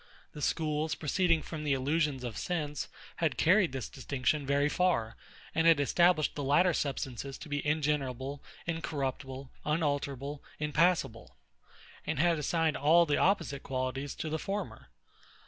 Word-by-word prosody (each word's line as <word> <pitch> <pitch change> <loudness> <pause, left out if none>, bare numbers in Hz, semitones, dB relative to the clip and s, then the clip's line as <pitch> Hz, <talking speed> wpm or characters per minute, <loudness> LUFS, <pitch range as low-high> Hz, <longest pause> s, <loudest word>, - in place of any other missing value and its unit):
The 150 - -9
schools, 155 0 0
proceeding 165 +1 +1
from 155 -2 -6
the 145 -2 +1
illusions 140 0 0
of 120 -3 -4
sense, 150 -4 -2 0.3
had 160 -5 0
carried 185 -1 +4
this 130 -3 -4
distinction 135 +2 -1
very 140 +1 +3
far; 150 -10 +1 0.4
and 165 +1 +3
had 165 -3 +6
established 165 +2 +3
the 145 - -4
latter 175 +6 +4
substances 135 -2 -3
to - - -10
be 145 -1 -2
ingenerable, 140 -3 -1 0.2
incorruptible, 135 -5 -4
unalterable, 145 -2 -1
impassable; 150 -5 +1 0.7
and 160 - -2
had 170 +1 +3
assigned 160 +1 +1
all 165 +4 +5
the 150 -3 +1
opposite 175 -8 +1
qualities 130 +1 -3
to 160 - -4
the 160 - -1
former. 200 +4 -4
150 Hz, 140 wpm, -31 LUFS, 135-165 Hz, 0.7 s, had